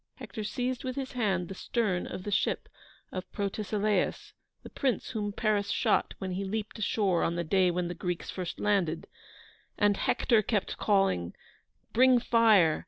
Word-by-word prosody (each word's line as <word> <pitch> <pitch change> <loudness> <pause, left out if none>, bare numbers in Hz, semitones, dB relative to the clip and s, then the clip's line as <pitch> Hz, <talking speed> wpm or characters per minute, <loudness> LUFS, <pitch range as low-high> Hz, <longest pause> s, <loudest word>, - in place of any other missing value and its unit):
Hector 220 - -7
seized 250 +4 -2
with 255 -1 -3
his 270 -2 -4
hand 195 -7 0
the 195 - -6
stern 195 -2 -1
of 185 - -6
the 205 - -4
ship 195 - 0 0.4
of 185 0 -6
Protesilaus, 205 0 -1 0.3
the - - -9
prince 265 -3 -1
whom 210 -3 -2
Paris 205 -1 0
shot - - +1
when 190 -1 -4
he 185 +2 -2
leaped 215 +2 -4
ashore 200 -4 +1
on 170 - 0
the 170 - -1
day 185 +2 +3
when 175 0 -1
the 175 - -4
Greeks 175 0 -4
first 180 -2 -5
landed; 185 -6 +1 0.7
and 205 -1 +3
Hector 230 -3 +2
kept 210 -1 -1
calling: 195 - +1 0.6
"Bring 255 +2 +6
fire!" 220 -9 +4
205 Hz, 165 wpm, -29 LUFS, 180-220 Hz, 0.7 s, Bring